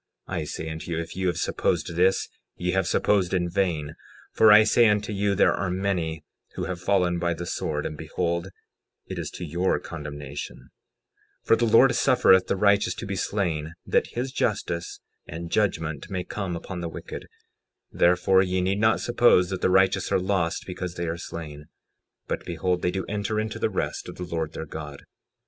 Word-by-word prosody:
I 85 -4 -3
say 80 +2 -5
unto 80 +2 -6
you, 85 - -2
if 85 0 -6
ye 95 0 -1
have 90 - 0
supposed - - -1
this 95 +2 +3 0.3
ye 90 0 -1
have 95 -1 +1
supposed 95 -3 +2
in 90 -1 +1
vain; 85 -5 -1 0.4
for 110 -1 +6
I 105 +1 +9
say 115 +2 +5
unto 105 0 +1
you, 100 0 +1
there - - +4
are 95 0 -2
many 90 -4 -2 0.3
who - - -3
have 90 -2 -4
fallen 90 -2 +2
by 85 -1 0
the 85 +2 -6
sword; 75 -3 -2
and - - -4
behold 85 +3 -2 0.6
it - - -6
is - - -4
to 90 - -7
your 85 +4 0
condemnation; 75 -3 -7 0.8
60:13 - - -29
For - - +7
the 120 - +1
Lord 115 +3 +6
suffereth 120 -8 +4
the - - +1
righteous 100 +1 +3
to - - -6
be 100 - -3
slain 80 -6 -2
that - - +2
his 130 +2 -2
justice 90 -9 -2 0.3
and 85 +1 -7
judgment 80 -8 -1
may 95 -2 -3
come 95 -2 -4
upon 90 +1 -6
the 85 - -3
wicked; - - -8 0.6
therefore 90 +2 +4
ye 95 -1 0
need 95 +2 0
not 110 +1 +3
suppose 120 -7 +4
that 95 - -3
the - - +3
righteous 95 0 +3
are - - +3
lost 90 -3 -1
because 90 -1 -5
they 85 0 -3
are 80 - -2
slain; 75 -4 -7 0.6
but - - -3
behold, 90 +1 -1
they 90 - +1
do 95 +1 -3
enter 105 +1 -2
into 110 0 -3
the - - +1
rest - - -3
of - - -8
the 90 - -6
Lord 80 -2 -3
their - - -5
God. 75 -2 -8
90 Hz, 195 wpm, -25 LUFS, 85-100 Hz, 0.8 s, I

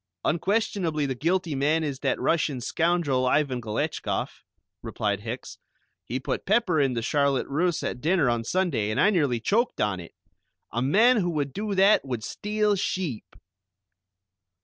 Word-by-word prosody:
"Unquestionably 175 -3 0
the 135 - -1
guilty 165 +5 0
man 150 +4 +1
is 140 -4 -3
that - - -1
Russian 150 -5 0
scoundrel 155 -2 +1
Ivan 130 -2 +1
Galetchkoff," 110 -2 -3 0.4
replied 100 -2 -2
Hicks, 115 +4 -7 0.5
"he 125 - -3
put 130 - -4
pepper 195 -7 +2
in 135 -2 +1
the 115 -1 -2
charlotte 140 0 +1
russe 165 +4 0
at 125 - -4
dinner 165 -2 +2
on 120 -1 0
Sunday, 155 - 0
and 110 - -1
I 210 - +5
nearly 145 - +1
choked 225 - 0
on 105 -3 0
it. 85 - -11 0.6
A 120 - -1
man 220 - +4
who 180 -4 +1
would 145 -5 -2
do 205 0 -3
that 195 +3 +5
would 125 -5 -4
steal 210 - 0
sheep!" 180 - -3
150 Hz, 155 wpm, -26 LUFS, 125-185 Hz, 0.6 s, I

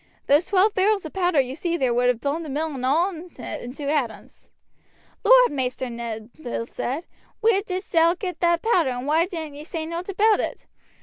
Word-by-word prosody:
Those 295 +5 +3
twelve 405 +2 +3
barrels 395 -1 +2
of 315 - -7
powder 355 -5 +2
you 260 0 0
see 340 +2 -1
there 260 -6 +1
would 245 +1 +2
have 250 -2 +2
blown 290 +4 -1
the 315 - -7
mill 305 +3 -2
and 260 -2 -6
all 325 +9 +2
in 350 0 -9
it - - -6
into 250 +5 -8
atoms." 255 -8 -3 0.8
"Lord, - - +7
Maister 255 -2 -2
Ned," 230 -1 -6
Bill 240 -4 -3
said, 275 +7 -4 0.3
"where 440 -3 +3
didst 375 -1 -5
thou 335 +1 +5
get 365 -1 -5
that 340 -1 +2
powder, 360 - +3
and 250 0 -4
why 320 +4 +2
didn't 320 -5 -6
ye 290 +1 -9
say 320 0 -5
nowt 335 +3 -5
about 420 +2 +3
it? - - -4
320 Hz, 205 wpm, -24 LUFS, 260-365 Hz, 0.8 s, Lord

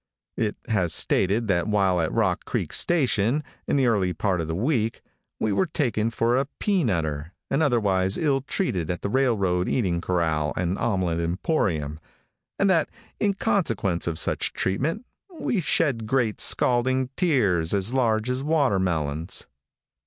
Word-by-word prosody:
It 110 -2 -1
has 95 -8 +1
stated 105 +5 +2
that 85 -1 +1
while 95 -4 +2
at 80 - -1
Rock - - 0
Creek - - -3
station, 140 -4 +2 0.2
in - - +1
the 135 -2 +3
early 100 -6 +1
part 95 -4 -1
of 80 - -4
the 80 - -3
week, 115 - -1 0.4
we 110 - 0
were 185 - +1
taken 115 -8 0
for 115 +1 +1
a 135 +2 +1
peanutter, 85 - -1 0.2
and 140 - +1
otherwise 100 -9 +2
ill 140 -4 +1
treated 125 - -2
at 90 - -3
the 100 - -2
railroad 100 -9 +1
eating 90 -9 0
corral 80 -4 0
and 90 +1 0
omelette 95 -6 0
emporium, 85 - -1 0.6
and 195 - +2
that 170 -5 +2 0.3
in 200 -2 +1
consequence 105 - 0
of 85 -2 -2
such - - +2
treatment 140 - -1 0.3
we 205 - 0
shed 135 -9 +1
great 115 -3 0
scalding 130 +1 +2
tears 105 - +2
as 100 +4 +1
large 115 -4 +1
as 125 +1 -1
watermelons. 95 - 0
105 Hz, 150 wpm, -24 LUFS, 90-130 Hz, 0.6 s, the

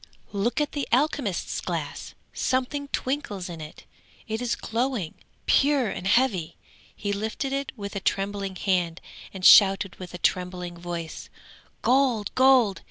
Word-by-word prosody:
'Look 205 +6 0
at 295 -1 0
the 285 -2 -3
alchemist's 255 - 0
glass! - - -5 0.2
something 260 +3 -1
twinkles 250 -10 -3
in 165 -2 -7
it; 155 +1 -10 0.4
it 220 +1 -3
is 245 -1 0
glowing, 230 -7 -2 0.3
pure 280 -5 +3
and 190 - -4
heavy. 195 -8 +2 0.4
He 205 -1 -2
lifted 220 +6 -3
it 275 0 -2
with 200 0 -6
a - - -1
trembling 195 0 -2
hand 180 -3 0 0.3
and 190 -2 -5
shouted 195 -1 +7
with 180 -1 -8
a - - -4
trembling 180 0 -1
voice: 170 -2 -6 0.5
"Gold! 250 -5 +2
gold!" 255 -6 +5
205 Hz, 140 wpm, -26 LUFS, 185-260 Hz, 0.5 s, shouted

